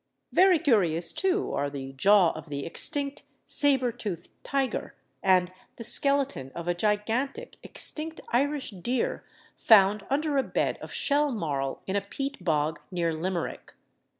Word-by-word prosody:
Very 370 -1 +5
curious 180 - +3
too, 385 +1 -1
are 145 0 -1
the 135 -1 -8
jaw 195 +5 +4
of 155 0 -10
the 140 -1 -5
extinct 280 - +2 0.2
sabre 265 -4 +2
toothed 205 -8 -6
tiger, 275 -2 -3 0.3
and 185 -1 +2 0.2
the 230 - -8
skeleton 275 - +2
of 170 0 -7
a 175 - +1
gigantic 225 - -2
extinct 320 +1 +1
Irish 280 +2 0
deer 245 - -3 0.3
found 205 -1 +4
under 290 +1 0
a - - +1
bed - - -2
of - - -9
shell 290 0 +1
marl 140 - -3
in 190 - -3
a 200 - +1
peat 270 +3 -6
bog 155 -1 0
near 170 -3 -1
Limerick. 170 +1 -5
210 Hz, 145 wpm, -27 LUFS, 170-280 Hz, 0.3 s, Very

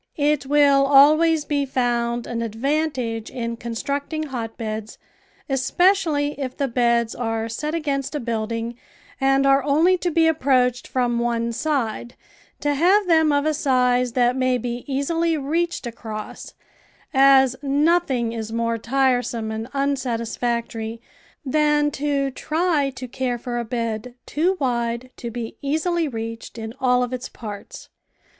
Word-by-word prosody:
It 295 -2 +1
will 280 -1 +4
always 305 +3 +5
be 285 -1 0
found 240 -2 -1
an 230 -1 -3
advantage 235 -1 -2
in 235 -1 -4
constructing 280 +7 -3
hotbeds, 225 -5 -5 0.5
especially 295 +2 +2
if 260 -2 -4
the 280 - 0
beds 235 -2 +1
are 225 -2 -2
set 300 +8 -3
against 280 -3 -2
a - - -1
building 230 0 -3 0.4
and 270 0 +3
are 275 0 +5
only 325 +6 +3
to 355 - 0
be 330 0 +3
approached 255 -5 +2
from 245 -2 0
one 235 -1 0
side, 245 -4 -2 0.5
to 290 0 +1
have 370 +8 +4
them 320 -3 +4
of 285 0 +1
a 310 - +2
size 250 -4 +2
that 245 0 +2
may 255 -1 +1
be 240 0 -4
easily 325 +4 0
reached 330 +3 -1
across, 220 -2 -7 0.6
as 265 -1 +6
nothing 285 -4 +1
is 225 -1 -5
more 230 0 -1
tiresome 245 -2 0
and 220 +1 -4
unsatisfactory 235 -4 -2 0.5
than 295 +1 +2
to 280 -1 -1
try 310 0 0
to 255 0 -6
care 250 0 -2
for 240 0 -4
a - - -2
bed 230 0 -4
too 355 +5 0
wide 240 -1 -1
to 235 - -5
be 230 -1 -6
easily 320 +4 0
reached 230 -2 -6
in 220 0 -6
all 250 -1 +3
of 250 0 -4
its 255 0 -5
parts. 210 -3 -9
255 Hz, 140 wpm, -22 LUFS, 235-290 Hz, 0.6 s, as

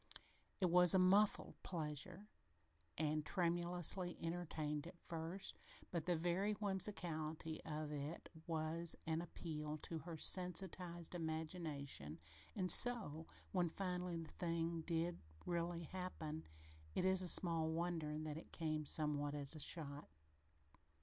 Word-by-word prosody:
It 180 -4 +1
was 180 0 +8
a - - +6
muffled 195 +3 +3
pleasure 170 +4 -5 0.7
and 155 0 0
tremulously 175 +1 +1
entertained 160 -3 -3
at 175 0 -11
first, 165 +3 -3 0.3
but 170 -1 -3
the 175 - +2
very 175 +5 0
whimsicality 170 -6 -1
of 155 -1 -4
it 150 +2 -5 0.2
was 165 +1 +1
an 160 0 -1
appeal 155 -3 -5
to 165 - -4
her 165 +1 -7
sensitized 180 -1 +2
imagination, 155 - -4 0.4
and 185 -2 +5
so, 195 -11 +7 0.2
when 180 -3 +1
finally 180 -1 -3
the 165 -1 -7
thing 165 -1 -2
did 170 0 -1 0.3
really 170 0 -2
happen, 160 -3 -6 0.5
it 185 - +1
is 185 -1 +4
small 165 -3 +4
wonder 160 -2 -2
that 155 -1 -4
it 160 - -11
came 155 -2 -2
somewhat 145 -1 0
as 140 0 +3
a 155 - -5
shock. 145 -1 -3
165 Hz, 125 wpm, -41 LUFS, 155-180 Hz, 0.7 s, was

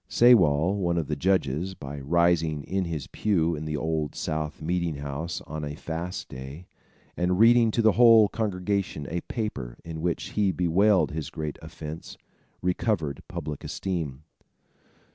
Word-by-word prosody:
Sewall, 95 -7 +5
one 85 -3 0
of 80 - 0
the 75 - -2
judges, 90 +1 0
by 70 -2 -7
rising 80 0 +2
in 95 +3 -1
his 80 -4 -4
pew 85 -6 0
in 75 +1 -6
the 75 -1 -2
Old 80 0 -2
South 75 -1 -3
meeting 85 -1 -1
house 70 +4 -4
on 75 0 -6
a 75 0 -4
fast 85 +4 -5
day, 65 +7 -9 0.5
and 90 +1 +1
reading 115 +2 +6
to 115 +1 0
the 110 - +6
whole 115 -1 +7
congregation 100 -6 -2
a 85 +1 -2
paper, 95 - -4
in 80 -1 -6
which 85 0 -2
he 100 -2 +1
bewailed 90 -1 +3
his 80 0 -4
great 75 -2 -5
offence, 80 0 -8 0.5
recovered 90 - 0
public 75 -4 -6
esteem. 80 -7 -4
85 Hz, 150 wpm, -26 LUFS, 75-95 Hz, 0.5 s, whole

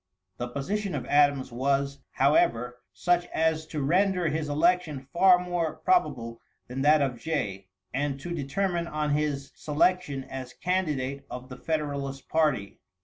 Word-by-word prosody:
The 120 - -3
position 185 +9 -2
of 130 -4 -3
Adams 145 -2 +3
was, 140 +2 0
however, 125 -3 +2
such 175 0 +1
as 160 -1 0
to 150 -3 -3
render 180 +3 +2
his 150 0 -2
election 155 -3 +1
far 185 +1 +7
more 175 -3 -2
probable 115 - 0 0.3
than 130 +2 -4
that 150 +1 +5
of 125 -4 -2
Jay, 105 -11 -3 0.3
and 140 +1 -1
to 175 +4 -5
determine 170 +4 -1
on 150 -2 -1
his 145 -2 -1
selection 150 -2 +1
as 130 -1 -7
candidate 150 -7 -2
of 125 +1 -7
the 125 - -7
Federalist 140 -3 -3
party. 150 -11 +1
145 Hz, 145 wpm, -27 LUFS, 135-170 Hz, 0.3 s, far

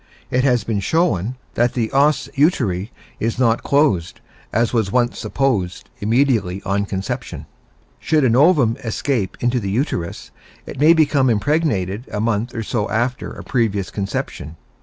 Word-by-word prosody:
It 125 +1 +2
has 125 -5 +2
been 110 -2 -1
shown 115 - 0 0.2
that 120 +1 +1
the 115 -3 -1
os 140 -1 +2
uteri 115 - +1 0.3
is 115 +2 -1
not 115 -2 +2
closed, 125 - +1 0.3
as 115 +2 +1
was 110 -5 +1
once 120 +1 +1
supposed, 105 -11 -1
immediately 110 -4 +1
on 100 +1 0
conception. 95 - -4 0.5
Should 155 -2 +1
an 120 -3 +3
ovum 135 -6 +4
escape 115 -2 -2
into 120 +1 +1
the 100 -4 -3
uterus, 100 - -3 0.3
it - - -8
may 155 +3 +7
become 145 -5 +3
impregnated 110 - 0
a 105 - -3
month 115 +2 -1
or 115 - -2
so 110 -1 -2
after 120 +3 -1
a - - -9
previous 105 -7 -1
conception. 95 -6 -4
115 Hz, 150 wpm, -20 LUFS, 100-135 Hz, 0.5 s, may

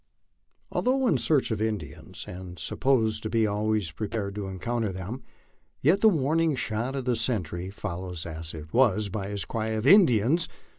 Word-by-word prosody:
A - - 0
I/THOUGH 260 +1 +2
in 150 - +3
search 135 0 +2
of 110 -1 -1
Indians 105 -10 -4
and 90 0 -8
supposed 115 -3 +1
to 110 - -4
be 115 -1 +2
always 105 -3 0
piepared 100 +2 -3
to. 105 0 -4
LA - - -5
encounter 115 +3 -2
them, 95 +8 -6 0.6
yet 175 +9 +3
the 220 - +7
warning 160 -1 +2
shot 120 +2 -2
of 135 -2 -3
the 125 -2 +2
sentry, 95 -7 -1
followed 90 -3 -5
as 80 0 -6
it 80 0 -10
was 110 -5 +3
by 100 0 -4
his 100 -5 -3
cry 110 +7 -2
of 110 +1 -2
"Indians!" 155 - +5
110 Hz, 180 wpm, -27 LUFS, 95-130 Hz, 0.6 s, the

